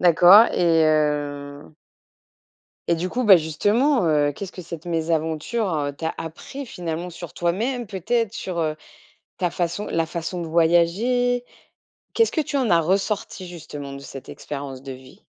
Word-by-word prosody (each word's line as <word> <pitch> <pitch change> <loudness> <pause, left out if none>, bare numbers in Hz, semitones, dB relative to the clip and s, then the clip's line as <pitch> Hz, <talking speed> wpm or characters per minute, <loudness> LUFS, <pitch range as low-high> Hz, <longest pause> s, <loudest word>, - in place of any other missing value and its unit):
D'accord 180 +5 +8
et 165 -2 +3
heu 145 -1 -1 1.1
et 170 - +4
du 175 +3 -2
coup, 250 +4 -2
bah, 195 -3 +9
justement, 205 - +1
heu, 145 -2 +2
qu'est-ce 195 +5 -7
que 180 - -8
cette 170 0 -9
mésaventure, 165 +5 -1
heu, 145 -1 -1
t'a 160 +3 -4
appris 260 - -7
finalement 175 -3 -5
sur 170 -1 -9
toi-même? 225 +8 -1
Peut-être 210 +3 -1
sur, 185 -6 -5
heu, 155 -1 -1 0.6
ta 180 -2 0
façon 175 +4 -2
la 165 -1 0
façon 170 +1 -4
de - - -5
voyager? 195 +10 +2 0.7
Qu'est-ce 455 - +3
que 320 - +1
tu 290 -1 -2
en 255 -7 +1
as 170 -1 +5
ressorti 190 +2 -1
justement 150 -5 -8
de 140 - -8
cette 135 -1 -10
expérience 140 -2 -7
de 135 -1 -7
vie? 130 0 -14
170 Hz, 155 wpm, -23 LUFS, 155-205 Hz, 1.1 s, bah